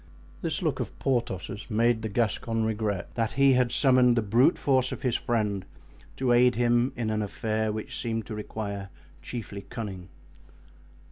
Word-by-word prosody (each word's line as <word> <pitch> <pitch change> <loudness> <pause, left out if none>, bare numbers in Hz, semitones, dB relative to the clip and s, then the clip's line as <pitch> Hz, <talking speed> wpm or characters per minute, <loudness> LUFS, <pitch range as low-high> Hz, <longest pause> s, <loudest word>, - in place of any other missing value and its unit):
This - - -1
look - - 0
of - - -5
Porthos's 115 -5 -2
made 115 +1 +2
the 110 - -3
Gascon 115 +1 0
regret 105 -3 -2
that 115 -2 -1
he 135 0 +5
had 125 -2 +2
summoned 125 -2 +4
the 115 - +2
brute 120 - +4
force 130 -2 +2
of - - -6
his 125 -3 +1
friend 105 -5 0 0.5
to 130 -2 0
aid 125 +1 +5
him 120 +2 +2
in 115 -3 -2
an 110 0 0
affair 110 +3 -1
which 110 0 -5
seemed 115 -1 -2
to 115 - -7
require 100 -2 -5 0.3
chiefly 105 -4 -6
cunning. 100 -7 -6
115 Hz, 160 wpm, -27 LUFS, 105-120 Hz, 0.5 s, he